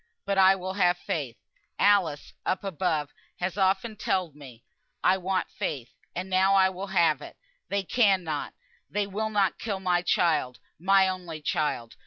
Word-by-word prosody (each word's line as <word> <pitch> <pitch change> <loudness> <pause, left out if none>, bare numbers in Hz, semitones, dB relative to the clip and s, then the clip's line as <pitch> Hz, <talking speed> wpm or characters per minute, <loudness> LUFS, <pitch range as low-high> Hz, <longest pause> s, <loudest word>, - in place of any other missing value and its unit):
But 200 -1 +1
I 190 0 +7
will 190 0 -5
have 180 -2 +2
faith. 140 -9 -4 0.4
Alice 195 -8 +2
(up 185 - -1
above) 165 -6 -1 0.3
has 180 0 -2
often 195 +3 +1
telled 185 -6 -1
me 130 -6 -13 0.4
I 190 - +4
wanted 185 0 -1
faith, 140 - -4 0.2
and 180 +2 -3
now 190 +1 +3
I 190 -1 +5
will 190 +2 -6
have 170 -6 +2
it. - - -11 0.3
They 200 -1 0
cannot 190 - +1 0.3
they 205 0 -1
will 210 +2 -3
not 200 -3 +1
kill 205 -4 -3
my 180 -2 +1
child, 160 -8 +1 0.2
my 190 +2 +4
only 180 -4 -5
child. 150 -7 -2
185 Hz, 160 wpm, -27 LUFS, 160-195 Hz, 0.4 s, I